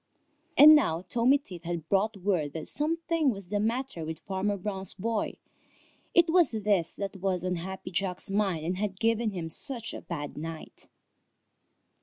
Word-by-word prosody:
And 305 +2 +11
now 180 - +3
Tommy 245 +7 +4
Tit 180 - -11
had 170 -2 -4
brought 200 +3 +1
word 175 -7 0
that 160 -1 -5
some 310 +3 0
thing 330 -4 +2
was 195 -6 -5
the 205 0 0
matter 230 -4 -1
with 160 0 -5
Farmer 200 +1 -1
Brown's 190 -1 -4
boy. 220 +3 -2 0.8
It 345 -1 +6
was 350 -1 +5
this 205 -6 0
that 200 -1 -5
was 185 -1 -1
on 180 -1 0
Happy 190 +1 -6
Jack's 190 +1 -1
mind 195 -6 0
and 180 +2 -1
had 195 -1 -3
given 230 0 +2
him 175 -5 -4
such 235 - -2
a - - -6
bad 145 -4 -6
night. 160 0 -7
195 Hz, 170 wpm, -29 LUFS, 175-230 Hz, 0.8 s, And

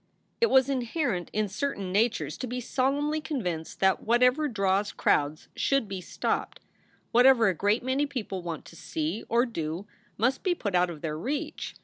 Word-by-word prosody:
It 465 - +6
was 265 0 +5
inherent 250 - -1
in 215 0 0
certain 200 -3 -3
natures 195 -8 +1
to 255 - -3
be 250 +1 -3
solemnly 285 +5 0
con 300 -3 -3
vinced 160 -3 -4
that 190 -1 +3
whatever 250 +6 +3
draws 200 -4 +1
crowds 150 +2 +1
should 275 -5 +1
be 195 -2 -5
stopped; - - -2 0.5
whatever 245 -2 +6
a - - +1
great 205 +7 +1
many 265 +3 +1
people 215 -9 -4
want 170 -2 -5
to - - -13
see 160 +5 -3
or 235 +2 +3
do 170 -5 -4 0.3
must 250 +5 +1
be 365 -2 +1
put 205 - -3
out 180 0 +3
of 160 -4 -8
their 155 -2 -3
reach. 280 - -4
225 Hz, 180 wpm, -28 LUFS, 180-265 Hz, 0.5 s, It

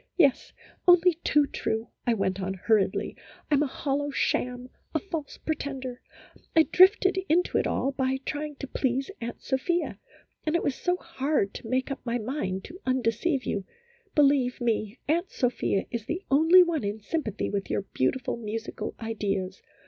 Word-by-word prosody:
" - - -49
Yes, 280 -7 +3 0.4
only 355 0 +7
too 295 -1 +4
true," 225 -4 -3 0.2
I 235 - +4
went 195 -2 -1
on, 190 +1 -2
hurriedly. 205 +1 +1 0.2
" - - -26
I - - +4
'm 285 - +4
a 300 - +2
hollow 285 +2 -2
sham, 250 -2 -1 0.2
a - - +3
false 325 -6 -5
pretender; 270 -5 -4 0.5
I 320 - +8
drifted 380 +2 +5
into 350 +3 +3
it - - 0
all 275 - 0
by 265 -1 0
trying 300 0 -3
to 275 - -6
please 265 +4 -1
Aunt 235 +1 -6
Sophia, 335 +6 -1 0.4
and 310 +1 0
it 340 - +1
was 280 - +1
so 360 +6 0
hard 295 - -1
to - - -8
make 260 +2 0
up 275 - -5
my 240 -1 -1
mind 210 -6 -3
to 355 +3 -10
undeceive 255 +3 0
you. 200 - -2 0.5
Be 295 - +6
lieve 270 -3 +3
me, 225 -1 -1
Aunt 340 +5 +1
Sophia 245 -6 0
is 235 -3 -4
the 360 +4 -3
only 325 +6 +7
one 335 -7 -1
in 205 +2 -2
sympathy 220 - -2
with 200 -1 -2
your - - 0
beautiful 235 - 0
musical 225 0 -5
ideas. 200 -4 -2
265 Hz, 175 wpm, -27 LUFS, 225-310 Hz, 0.5 s, I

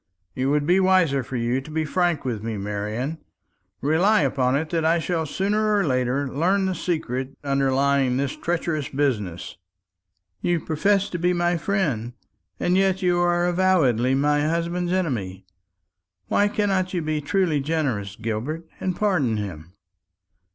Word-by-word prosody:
It 130 +1 -1
would 145 +1 +1
be 180 +4 +4
wiser 185 -7 +3
for 130 +1 -7
you 120 +2 0
to 135 - -12
be 155 0 -1
frank 175 -2 0
with 115 -5 -2
me, 110 -1 -4
Marian. 105 +9 -3 0.6
Rely 180 +9 +3
upon 130 -1 +1
it 155 +2 -2
that 165 -2 0
I 165 +2 +3
shall 165 -1 -1
sooner 210 +5 +1
or 200 - +2
later 130 +1 0
learn 180 +9 +1
the 190 - 0
secret 135 -7 -3
underlying 135 -1 +2
this 140 0 -1
treacherous 165 -4 -2
business." 110 - -2 0.8
"You 175 -1 +1
profess 195 +6 +1
to 175 - -3
be 180 +1 +2
my 175 0 +1
friend, 155 - -1 0.5
and 180 - +1
yet 190 0 +2
are 175 -1 +2
avowedly 165 -9 +2
say 145 +1 +2
husband's 170 +1 -1
enemy. 110 - -2 0.8
Why 205 - +3
cannot 195 -3 0
you 170 - -1
be 155 -1 -1
truly 165 -1 +1
generous, 135 -10 -2
Gilbert, 115 +10 -4
and 185 -1 -2
pardon 165 - +1
him? 90 -5 -6
155 Hz, 150 wpm, -23 LUFS, 130-180 Hz, 0.8 s, be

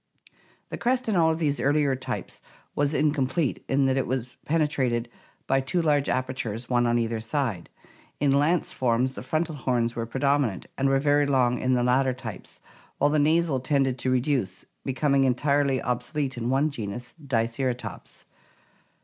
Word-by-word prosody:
The - - -6
crest 250 +1 0
in 215 - +1
all 165 -2 +4
of 160 - -1
these 145 -3 0
earlier 145 -1 +2
types 130 - -6 0.3
was 145 +1 0
incomplete 150 0 0
in 135 0 +3
that 135 0 +2
it 135 - 0
was 130 -1 -3
penetrated 130 -7 0 0.4
by 135 0 +2
two 135 +7 -1
large 150 -4 +2
apertures, 125 -3 -2
one 120 -1 +2
on 120 0 +2
either 115 -1 -1
side. 115 - -2 0.5
In 145 -1 +2
Lance 150 +5 +2
forms 125 +1 +1
the - - -7
frontal 160 +1 -1
horns 120 -4 -1
were 115 -1 -3
predominant, 135 -5 0
and 135 0 +1
were 135 0 +3
very 145 0 +3
long 125 -3 +2
in 130 0 +1
the 120 - +1
later 130 +1 +2
types, - - -9 0.4
while 145 +1 +3
the 155 - +3
nasal 155 -1 +2
tended 135 -1 +1
to 130 - 0
reduce, 125 -7 0 0.2
becoming 135 +1 +1
en 130 -2 +3
tirely 140 0 +1
obsolete 130 +3 -2
in 120 0 -3
one 140 +4 +2
genus, 120 -1 -6
Diceratops. 125 0 -3
135 Hz, 165 wpm, -26 LUFS, 125-145 Hz, 0.5 s, all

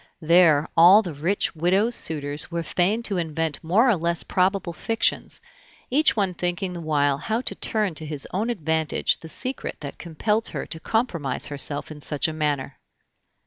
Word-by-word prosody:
There 160 -2 +4
all 180 +6 +7
the 175 -5 -5
rich 170 +7 -1
widows' 190 +8 +2
suitors 145 -6 0
were 170 -1 -3
fain 190 +8 0
to 200 -4 -2
invent 160 -2 -3
more 200 +10 +3
or 235 - +4
less 170 0 -1
probable 185 -1 0
fictions, 225 +7 -1 0.5
each 300 +4 +3
one 195 -4 0
thinking 180 +1 -3
the 170 - -6
while 145 -3 +1
how 220 +9 -2
to - - 0
turn 210 -5 -1
to 155 0 -8
his 150 -2 -3
own 210 +6 -1
advantage 160 -7 0
the 160 - -11
secret 260 +9 -4
that 140 -2 -8
compelled 210 +7 -1
her - - -5
to 160 - -7
compromise 170 - 0
herself 145 +1 -3
in 150 -1 -10
such 150 +2 0
a 160 - -4
manner. 145 -3 -2
170 Hz, 175 wpm, -24 LUFS, 155-200 Hz, 0.5 s, all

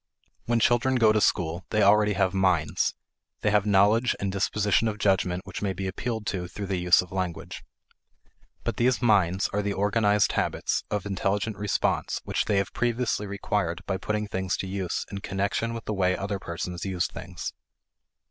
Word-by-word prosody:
When 120 0 +2
children 120 +3 +3
go 115 -3 +5
to 110 0 +2
school, 85 -1 +1
they 110 -1 +2
already 105 +1 +5
have 95 -2 +1
"minds" 90 -4 +1 0.5
they 105 - +2
have 105 0 +2
knowledge 105 +5 +4
and 100 -1 -1
dispositions 105 +3 +1
of 105 - -5
judgment 95 -3 +1
which 100 - -7
may 100 -2 -1
be 95 +1 -5
appealed 110 +3 -3
to 90 -3 -2
through 100 +3 -6
the 95 -2 -2
use 90 0 +5
of 90 - -15
language. 90 -3 -4 1.0
But 115 -3 -2
these 120 -2 +2
"minds" 95 -5 +3
are 105 - +1
the 100 0 -1
organized 105 +1 +2
habits - - -1
of 105 -2 -2
intelligent 100 +2 -1
response 105 0 0
which - - -1
they 105 - +1
have 100 - -1
previously 120 -3 0
required 100 -3 -2
by 95 - -1
putting 105 +2 -2
things 95 -2 -2
to 95 - -4
use 95 -2 -3
in 100 - -4
connection 100 +4 -1
with 115 -1 -6
the 110 - -2
way 95 -2 +1
other 100 0 -3
persons 85 0 -5
use 95 -3 -1
things. - - -6
100 Hz, 180 wpm, -26 LUFS, 95-105 Hz, 1.0 s, go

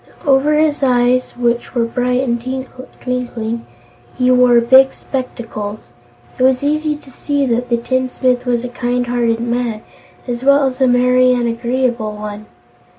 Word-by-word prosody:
Over 285 +2 +3
his 305 -1 +1
eyes, 250 -1 +1
which 240 +1 -1
were 235 -1 +2
bright 250 +2 0
and 235 -2 -1 0.6
twinkling, 235 -2 -4 0.5
he 255 0 +3
wore 250 -1 +5
big 260 +3 +5
spectacles. 220 - -6 0.5
It - - +2
was 260 0 +3
easy 305 +1 0
to 285 -2 -15
see 285 +1 -1
that 245 0 -1
the 235 - +2
tinsmith 255 0 -1
was 240 0 0
a - - -5
kind 245 0 -2
hearted 240 -2 0
man, 235 -2 -2 0.4
as 245 0 -4
well 280 +1 +4
as 260 0 -3
a 260 - +5
merry 250 +1 +4
and 240 -1 0
agreeable 235 -1 -1
one. 210 0 -8
250 Hz, 155 wpm, -17 LUFS, 235-260 Hz, 0.6 s, wore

